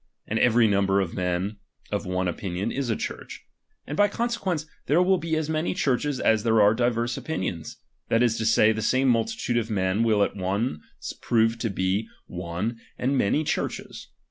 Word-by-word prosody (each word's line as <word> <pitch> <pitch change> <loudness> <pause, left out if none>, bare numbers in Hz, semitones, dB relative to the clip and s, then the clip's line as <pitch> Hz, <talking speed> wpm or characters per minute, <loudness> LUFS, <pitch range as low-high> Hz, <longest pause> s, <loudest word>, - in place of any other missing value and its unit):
And 110 - -1
every 120 -1 +4
number 100 -1 +2
of 95 -4 -2
men 90 +3 -2 0.3
of - - -2
one 90 0 -1
opinion 90 +1 -3
is 135 -2 -2
a 110 - +1
Church; - - -6 0.4
and 145 - -5
by 205 +5 +5
conse 230 +3 -2
quence, 175 -6 -2 0.2
there 150 +5 +4
will 185 0 +3
be 165 -1 -1
as 155 -1 -1
many 160 +3 -1
Churches 140 -3 0
as 110 -1 +3
there 115 0 +3
are 105 0 +6
divers 120 0 0
opinions; 90 - -4 0.3
that 115 +1 +3
is 115 -2 +2
to 110 - -1
say, 110 -1 +5
the 110 0 -2
same 130 +5 +2
multitude 120 - +1
of 115 -1 -1
men 95 0 0
will 110 -3 +3
at - - -2
once 95 -2 -3
prove 115 0 +2
to 115 - -1
be 95 +3 -1 0.2
one, 90 +7 -4 0.2
and 135 +3 0
many 130 +5 +2
ChurcJtes. - - -3
115 Hz, 190 wpm, -25 LUFS, 100-135 Hz, 0.4 s, are